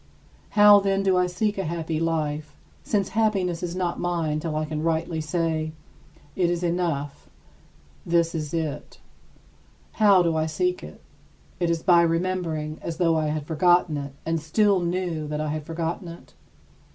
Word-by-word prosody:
How, 205 Hz, 0 st, +9 dB
then, 195 Hz, 0 st, 0 dB
do 190 Hz, -1 st, +3 dB
I 180 Hz, 0 st, +3 dB
seek 200 Hz, +3 st, -1 dB
a -, -, 0 dB
happy 160 Hz, -1 st, -3 dB
life, 155 Hz, -2 st, -2 dB, 0.3 s
since 200 Hz, -3 st, -1 dB
happiness 195 Hz, -5 st, 0 dB
is 175 Hz, 0 st, -4 dB
not 180 Hz, -2 st, -2 dB
mine 165 Hz, -4 st, -1 dB
till 155 Hz, -1 st, -4 dB
I 155 Hz, 0 st, -1 dB
can 155 Hz, 0 st, -4 dB
rightly 160 Hz, 0 st, -1 dB
say: 155 Hz, 0 st, -1 dB, 0.6 s
"It 180 Hz, -2 st, +2 dB
is 175 Hz, 0 st, -1 dB
enough. 165 Hz, -5 st, -2 dB, 0.7 s
This 170 Hz, -1 st, +1 dB
is 155 Hz, -3 st, -4 dB
it." 160 Hz, -3 st, -4 dB, 0.9 s
How 200 Hz, -4 st, +5 dB
do 165 Hz, -1 st, +1 dB
I 155 Hz, 0 st, 0 dB
seek 360 Hz, -, -1 dB
it? -, -, -11 dB, 0.6 s
Is 170 Hz, -2 st, 0 dB
it -, -, -24 dB
by 175 Hz, -2 st, +6 dB
remembering, 165 Hz, -3 st, -1 dB
as 165 Hz, -1 st, -5 dB
though 165 Hz, -2 st, +2 dB
I 155 Hz, -1 st, 0 dB
had 150 Hz, -1 st, -2 dB
forgotten 175 Hz, 0 st, +3 dB
it 140 Hz, -1 st, -5 dB
and 165 Hz, -1 st, -1 dB
still 200 Hz, +5 st, +2 dB
knew 175 Hz, -3 st, -2 dB
that 150 Hz, 0 st, -3 dB
I 155 Hz, 0 st, -2 dB
had 150 Hz, 0 st, -4 dB
forgotten 165 Hz, +3 st, -3 dB
it? 170 Hz, 0 st, -12 dB
165 Hz, 165 wpm, -25 LUFS, 155-180 Hz, 0.9 s, How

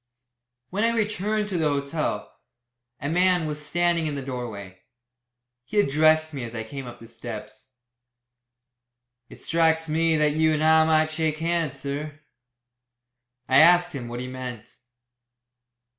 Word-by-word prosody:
When 200 Hz, +4 st, -1 dB
I 230 Hz, 0 st, +2 dB
returned 210 Hz, 0 st, -1 dB
to 180 Hz, -4 st, -1 dB
the 155 Hz, -2 st, +2 dB
hotel, 145 Hz, +2 st, -2 dB, 0.7 s
a 145 Hz, -, -4 dB
man 180 Hz, +1 st, +2 dB
was 150 Hz, -1 st, -4 dB
standing 170 Hz, 0 st, +1 dB
in 145 Hz, -, -3 dB
the 140 Hz, -, -5 dB
doorway. 110 Hz, -8 st, -7 dB, 0.8 s
He 155 Hz, -, -1 dB
addressed 155 Hz, -1 st, +3 dB
me 135 Hz, -3 st, -5 dB
as 115 Hz, 0 st, -7 dB
I 110 Hz, -, -3 dB
came 130 Hz, +3 st, -8 dB
up 120 Hz, 0 st, -10 dB
the 115 Hz, -, -12 dB
steps. 115 Hz, +1 st, -9 dB, 1.6 s
"It -, -, -13 dB
strikes 160 Hz, -1 st, +2 dB
me 160 Hz, +1 st, +2 dB
that 150 Hz, -1 st, +3 dB
you 160 Hz, 0 st, +2 dB
and 155 Hz, -, -1 dB
I 160 Hz, 0 st, +6 dB
might 155 Hz, 0 st, +2 dB
shake 155 Hz, -1 st, -1 dB
hands, 165 Hz, -4 st, -1 dB
sir." 145 Hz, +2 st, -5 dB, 1.3 s
I 130 Hz, -, +4 dB
asked 175 Hz, +2 st, +6 dB
him 130 Hz, -4 st, -6 dB
what 120 Hz, +1 st, -6 dB
he 125 Hz, -, -4 dB
meant. 125 Hz, -3 st, -8 dB
155 Hz, 145 wpm, -25 LUFS, 130-165 Hz, 1.6 s, I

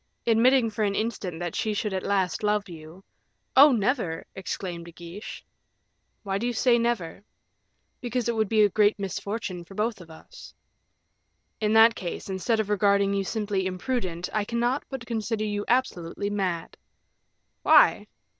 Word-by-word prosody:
Admitting 235 Hz, +1 st, +4 dB
for 215 Hz, +1 st, -2 dB
an 200 Hz, -1 st, 0 dB
instant 200 Hz, -7 st, -3 dB
that 175 Hz, -2 st, -4 dB
she 215 Hz, -1 st, -1 dB
should 205 Hz, -1 st, -2 dB
at 190 Hz, -, -1 dB
last 190 Hz, -2 st, 0 dB
love 210 Hz, 0 st, 0 dB
you 165 Hz, +2 st, -12 dB, 0.3 s
" -, -, -49 dB
"Oh, 280 Hz, +2 st, +9 dB
never!" 220 Hz, -, 0 dB
exclaimed 185 Hz, -3 st, -5 dB
De 170 Hz, -, -11 dB
Guiche. 175 Hz, +5 st, -9 dB, 0.8 s
"Why 195 Hz, -1 st, -2 dB
do 235 Hz, -, -1 dB
you 245 Hz, -, -1 dB
say 240 Hz, +1 st, +3 dB
never?" 225 Hz, -7 st, -2 dB, 0.8 s
"Because 245 Hz, -1 st, -2 dB
it 235 Hz, -, 0 dB
would 220 Hz, -2 st, 0 dB
be 215 Hz, -1 st, +4 dB
a 205 Hz, -, +4 dB
great 210 Hz, +2 st, +3 dB
misfortune 200 Hz, -1 st, -4 dB
for 195 Hz, +3 st, -14 dB
both 215 Hz, -1 st, -1 dB
of 170 Hz, -, -14 dB
us." 160 Hz, -, -14 dB, 1.0 s
"In 215 Hz, 0 st, +1 dB
that 225 Hz, +1 st, +7 dB
case, 185 Hz, -1 st, -6 dB
instead 220 Hz, +4 st, 0 dB
of 210 Hz, -1 st, -1 dB
regarding 200 Hz, -1 st, +3 dB
you 200 Hz, 0 st, 0 dB
simply 200 Hz, -2 st, -2 dB
imprudent, 185 Hz, -3 st, -3 dB
I 215 Hz, -, +1 dB
cannot 240 Hz, +5 st, -1 dB
but 265 Hz, -4 st, -6 dB
consider 225 Hz, -2 st, -2 dB
you 205 Hz, -1 st, -2 dB
absolutely 205 Hz, -6 st, -1 dB
mad." 185 Hz, -5 st, -3 dB, 0.8 s
"Why?" -, -, +5 dB
205 Hz, 165 wpm, -26 LUFS, 185-230 Hz, 1.0 s, Oh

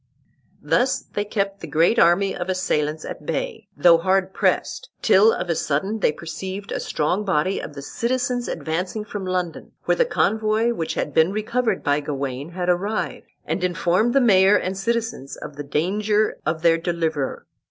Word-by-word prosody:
Thus 260 Hz, +2 st, +2 dB
they 205 Hz, -, 0 dB
kept 200 Hz, -1 st, -2 dB
the 165 Hz, -, -7 dB
great 165 Hz, +10 st, +3 dB
army 185 Hz, +4 st, +4 dB
of 180 Hz, +1 st, -4 dB
assailants 155 Hz, -4 st, -1 dB
at -, -, -7 dB
bay, 180 Hz, +7 st, -4 dB
though 170 Hz, -2 st, +6 dB
hard 190 Hz, +2 st, +1 dB
pressed, -, -, 0 dB
till 210 Hz, +4 st, +6 dB
of 180 Hz, -, -3 dB
a 170 Hz, -, +1 dB
sudden 190 Hz, +12 st, -1 dB
they 195 Hz, -, +3 dB
perceived 190 Hz, +5 st, -7 dB
a -, -, -2 dB
strong 180 Hz, +7 st, -1 dB
body 190 Hz, -1 st, 0 dB
of 145 Hz, -, -8 dB
the 140 Hz, -, -7 dB
citizens 245 Hz, -, -1 dB
advancing 180 Hz, +7 st, -3 dB
from 205 Hz, -2 st, -5 dB
London, 180 Hz, -3 st, -3 dB
where -, -, +1 dB
the -, -, +5 dB
convoy 220 Hz, -, +1 dB
which 165 Hz, -8 st, -3 dB
had 145 Hz, -, -2 dB
been 160 Hz, +5 st, +4 dB
recovered 220 Hz, 0 st, -1 dB
by 145 Hz, 0 st, +2 dB
Gawain 140 Hz, +1 st, -4 dB
had 180 Hz, 0 st, -3 dB
arrived, 195 Hz, +5 st, -1 dB, 0.2 s
and 185 Hz, -, -2 dB
informed 180 Hz, +6 st, +1 dB
the 275 Hz, -, +5 dB
mayor 195 Hz, -3 st, +5 dB
and 185 Hz, -1 st, -1 dB
citizens 225 Hz, -, -2 dB
of 145 Hz, -, -9 dB
the 145 Hz, -, -6 dB
danger 205 Hz, +9 st, 0 dB
of 160 Hz, +1 st, -1 dB
their 165 Hz, -1 st, +4 dB
deliverer. 165 Hz, -5 st, -2 dB
185 Hz, 175 wpm, -22 LUFS, 160-215 Hz, 0.2 s, though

